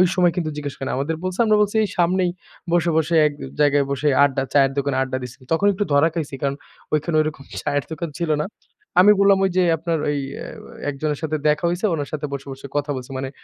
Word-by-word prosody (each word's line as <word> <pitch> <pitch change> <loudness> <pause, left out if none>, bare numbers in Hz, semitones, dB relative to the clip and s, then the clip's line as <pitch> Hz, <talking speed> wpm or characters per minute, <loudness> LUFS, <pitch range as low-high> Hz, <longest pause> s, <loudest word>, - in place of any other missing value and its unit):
সময় 180 -2 +4
কিন্তু 165 -3 -1
জিজ্ঞেস 145 -2 -4
করে 135 - -5
না। - - -1
আমাদের 145 +4 -1
বলছে, 185 +2 -3
আমরা 215 -1 +4
বলছি, 205 +1 0
এই 205 - -1
"সামনেই 180 +1 +2 0.4
বসে, 175 -1 +2
বসে 160 +1 +1
এক 145 - -4 0.3
জায়গায় 145 -1 +4
বসে 140 +2 -1 0.2
আড্ডা 135 -1 +2
চায়ের 135 -2 +4
দোকানে 140 -1 0
আড্ডা 130 0 -3
দিছি।" 125 -1 -8 0.2
তখন 200 +5 +2
একটু 200 +2 -1
ধরা 140 +3 +5
খাইছি 150 -5 -3
কারণ 140 -1 0 0.4
ঐখানে 155 +1 +1
ওরকম 155 -2 -4 0.2
চায়ের 145 -2 0
দোকান 160 +1 -4
ছিল 170 -2 -1
না। - - -2 0.5
আমি 205 +3 +8
বললাম, 200 0 +5
"ওই - - +2
যে 185 - +5
আপনার 165 +1 -1
ওই 145 - 0 0.2
অ্যা - - -7 0.4
একজনের 145 +1 -2
সাথে 155 -1 -1
দেখা 150 +3 +2
হইছে, 175 +5 -1
উনার 145 -3 -3
সাথে 150 -1 -2
বসে, 140 0 -6
বসে 135 +1 -10
কথা 145 0 -1
বলছি।" 130 +1 -7
মানে 130 0 -3
150 Hz, 225 wpm, -22 LUFS, 140-175 Hz, 0.5 s, আমি